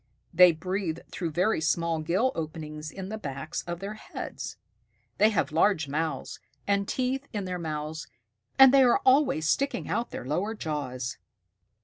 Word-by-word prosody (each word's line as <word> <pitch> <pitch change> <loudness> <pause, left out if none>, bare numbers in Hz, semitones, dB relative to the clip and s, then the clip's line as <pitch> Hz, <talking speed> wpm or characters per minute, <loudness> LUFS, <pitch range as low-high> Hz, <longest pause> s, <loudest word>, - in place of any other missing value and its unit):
They 180 +1 +8
breathe 180 0 -3
through 170 -2 -3
very 180 +4 +1
small 165 0 +1
gill 185 +11 +1
openings 155 -1 -5
in 190 +3 -7
the 220 +1 -5
backs 140 0 -5
of 170 0 -4
their 200 +2 -4
heads. 215 - -7 0.6
They 215 - +6
have 195 -9 0
large 160 0 +2
mouths, 155 +3 -3 0.3
and 200 0 +1
teeth 265 +2 -1
in 205 -3 -2
their 180 -1 -3
mouths, 155 -1 -4 0.5
and 265 -1 +9
they 275 - +7
are 245 -2 +4
always 260 - +4
sticking 275 - 0
out 240 - -1
their - - -7
lower 185 - -1
jaws." 130 - -4
175 Hz, 155 wpm, -28 LUFS, 155-215 Hz, 0.6 s, and